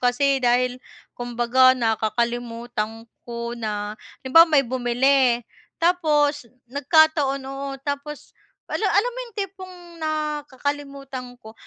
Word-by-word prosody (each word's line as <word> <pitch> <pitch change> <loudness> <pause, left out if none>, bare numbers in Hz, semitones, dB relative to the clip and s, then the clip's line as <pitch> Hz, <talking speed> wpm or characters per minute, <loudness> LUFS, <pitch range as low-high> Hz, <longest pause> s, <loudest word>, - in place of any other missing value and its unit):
kasi 265 +2 +2
dahil 250 +1 +1 0.3
kumbaga 245 +2 +3
nakakalimutan 230 0 -2 0.2
ko 235 0 -4
na, 210 -3 -4 0.3
halimbawa 330 +6 +7
may 285 -4 +4
bumili 245 0 +2 0.3
tapos 300 -6 +2 0.2
nagkataon, 285 -2 +3
oo 275 +1 -5 0.2
tapos 285 +1 -5 0.4
ala - - -3
alam 475 +4 +2
mo - - -9
'yung 465 -4 -16
tipong 380 -2 -6 0.3
nakakalimutan 285 -4 -4
ko. 220 0 -12
265 Hz, 105 wpm, -23 LUFS, 240-295 Hz, 0.4 s, halimbawa